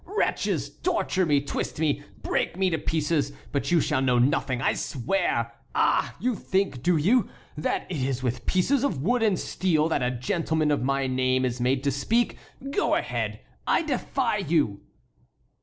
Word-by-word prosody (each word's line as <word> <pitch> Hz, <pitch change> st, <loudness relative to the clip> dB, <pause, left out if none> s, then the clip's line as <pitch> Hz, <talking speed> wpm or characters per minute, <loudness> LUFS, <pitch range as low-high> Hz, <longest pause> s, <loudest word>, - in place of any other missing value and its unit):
"Wretches! 410 Hz, +4 st, -1 dB
torture 190 Hz, -, +1 dB
me, 145 Hz, -2 st, +3 dB
twist 140 Hz, -, -4 dB
me, 150 Hz, -2 st, +1 dB, 0.2 s
break -, -, -1 dB
me 190 Hz, -1 st, +2 dB
to 160 Hz, -, 0 dB
pieces, 150 Hz, -2 st, 0 dB, 0.2 s
but 140 Hz, -, -1 dB
you 175 Hz, -1 st, +4 dB
shall 145 Hz, -3 st, +1 dB
know 125 Hz, -2 st, +3 dB
nothing, 130 Hz, 0 st, +2 dB
I 135 Hz, -, +2 dB
swear! 120 Hz, -4 st, -1 dB, 0.2 s
Ah! -, -, +2 dB
you 250 Hz, +2 st, +1 dB
think, 190 Hz, -11 st, -1 dB
do 175 Hz, +5 st, +3 dB
you, 205 Hz, +8 st, +3 dB, 0.3 s
that 150 Hz, -, -1 dB
it 180 Hz, -, -4 dB
is 130 Hz, -1 st, -1 dB
with 125 Hz, -1 st, -2 dB
pieces 245 Hz, +9 st, +2 dB
of 165 Hz, -, -1 dB
wood 245 Hz, +6 st, +2 dB
and 210 Hz, -5 st, +3 dB
steel 160 Hz, -4 st, +1 dB
that 160 Hz, -, +1 dB
a 125 Hz, -, +1 dB
gentleman 155 Hz, +5 st, 0 dB
of 145 Hz, -, +1 dB
my 135 Hz, +1 st, 0 dB
name 130 Hz, 0 st, +1 dB
is 125 Hz, -1 st, -2 dB
made 130 Hz, +2 st, +1 dB
to 140 Hz, -, +2 dB
speak? 225 Hz, -, +1 dB, 0.4 s
Go 410 Hz, -, +2 dB
ahead! -, -, -2 dB, 0.3 s
I -, -, +3 dB
defy 260 Hz, -5 st, -1 dB
you!" 150 Hz, -, 0 dB
150 Hz, 175 wpm, -26 LUFS, 130-190 Hz, 0.4 s, you